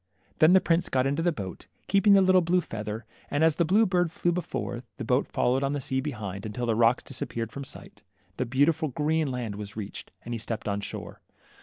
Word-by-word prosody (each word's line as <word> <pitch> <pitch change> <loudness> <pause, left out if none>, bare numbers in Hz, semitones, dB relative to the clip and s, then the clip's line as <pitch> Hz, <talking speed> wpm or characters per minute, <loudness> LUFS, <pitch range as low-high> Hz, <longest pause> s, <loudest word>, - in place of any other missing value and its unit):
Then 155 +3 +7
the 190 - +8
prince 170 -1 +1
got 130 -1 +2
into 140 +4 0
the 175 +1 +2
boat, 100 - -7 0.2
keeping 200 +1 +5
the 195 - +7
lit 185 0 +4
tle 185 - +6
blue 175 +2 +2
feather, 110 -4 -5 0.2
and 145 +2 +1
as 160 -2 +4
the 170 - +3
blue 205 +7 +4
bird 180 -3 +2
fiew 175 +1 0
before, 160 -8 -3 0.2
the 135 - -4
boat 125 +4 +2
followed 130 +2 +1
on 140 +1 0
the 145 - -1
sea 130 0 -1
behind, 105 -9 -5
until 110 +3 -3
the 115 - +2
rocks 115 +2 +3
dis 130 -2 -8
appeared 115 -1 -3
from 140 +5 -6
sight, 130 -6 -8 0.4
the 125 - 0
beautiful 150 +6 +2
green 155 +3 0
land 125 -4 -3
was 105 +1 -7
reached, 105 -2 -6 0.2
and 120 - -4
he 115 - -3
stepped 110 0 -4
on 100 0 -1
shore. - - -7
135 Hz, 230 wpm, -27 LUFS, 115-165 Hz, 0.4 s, the